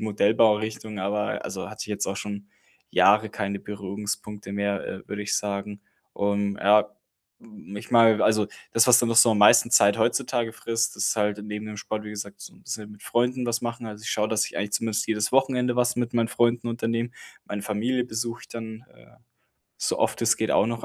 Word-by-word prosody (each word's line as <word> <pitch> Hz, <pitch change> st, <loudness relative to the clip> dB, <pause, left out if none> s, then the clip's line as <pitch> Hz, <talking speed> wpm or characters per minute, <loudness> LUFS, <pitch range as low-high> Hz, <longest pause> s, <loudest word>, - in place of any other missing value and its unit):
Modellbaurichtung, 110 Hz, 0 st, +1 dB
aber 100 Hz, +2 st, -2 dB
also, -, -, -5 dB
hatte -, -, -7 dB
ich -, -, -8 dB
jetzt 105 Hz, -, -2 dB
auch 95 Hz, -, -3 dB
schon 100 Hz, -1 st, -6 dB, 0.4 s
Jahre 105 Hz, +2 st, +4 dB
keine 100 Hz, -2 st, -3 dB
Berührungspunkte 105 Hz, 0 st, -6 dB
mehr, 100 Hz, -1 st, -2 dB
äh, 95 Hz, -, -8 dB
würde 105 Hz, 0 st, -4 dB
ich 100 Hz, -, -1 dB
sagen. 100 Hz, 0 st, -4 dB, 0.3 s
Und 100 Hz, 0 st, -1 dB
ja, 105 Hz, +1 st, +4 dB, 0.5 s
hm, 105 Hz, -2 st, -12 dB
ich 105 Hz, -, -9 dB
meine 115 Hz, -2 st, +5 dB
also, 110 Hz, -1 st, +3 dB, 0.3 s
das, 115 Hz, +2 st, +5 dB
was 125 Hz, 0 st, +7 dB
dann 120 Hz, -, +2 dB
noch 115 Hz, -, 0 dB
so 115 Hz, 0 st, +8 dB
am 110 Hz, -, +1 dB
meisten 115 Hz, +3 st, +6 dB
Zeit 100 Hz, -3 st, +5 dB
heutzutage 120 Hz, 0 st, 0 dB
frisst, 115 Hz, 0 st, -2 dB
ist 100 Hz, +3 st, 0 dB
halt 105 Hz, 0 st, 0 dB
neben 105 Hz, 0 st, -6 dB
dem 105 Hz, -1 st, -7 dB
Sport, 105 Hz, +1 st, -4 dB
wie 105 Hz, -, -7 dB
gesagt, 100 Hz, -1 st, -8 dB
so -, -, -10 dB
'n -, -, -21 dB
bisschen 105 Hz, -1 st, -6 dB
mit 105 Hz, -, -16 dB
Freunden 125 Hz, +1 st, 0 dB
was 120 Hz, 0 st, -1 dB
machen. 120 Hz, 0 st, -4 dB
Also, 105 Hz, 0 st, -9 dB
ich -, -, -4 dB
schaue, 105 Hz, 0 st, 0 dB
dass 110 Hz, -2 st, +1 dB
ich -, -, -10 dB
eigentlich 105 Hz, 0 st, -3 dB
zumindest 110 Hz, -2 st, -1 dB
jedes 105 Hz, -1 st, -1 dB
Wochenende 125 Hz, -2 st, +2 dB
was 125 Hz, 0 st, +2 dB
mit 120 Hz, -1 st, -1 dB
meinen 115 Hz, -1 st, +2 dB
Freunden 120 Hz, 0 st, +1 dB
unternehme. 115 Hz, 0 st, -2 dB, 0.3 s
Meine 105 Hz, 0 st, -5 dB
Familie 120 Hz, +4 st, -1 dB
besuche 115 Hz, 0 st, -4 dB
ich -, -, -14 dB
dann, 110 Hz, 0 st, -8 dB
äh, 125 Hz, -, -21 dB, 0.6 s
so -, -, -1 dB
oft -, -, 0 dB
es -, -, +3 dB
geht -, -, -1 dB
auch 105 Hz, -, +4 dB
noch 115 Hz, 0 st, -4 dB
110 Hz, 205 wpm, -25 LUFS, 105-115 Hz, 0.6 s, so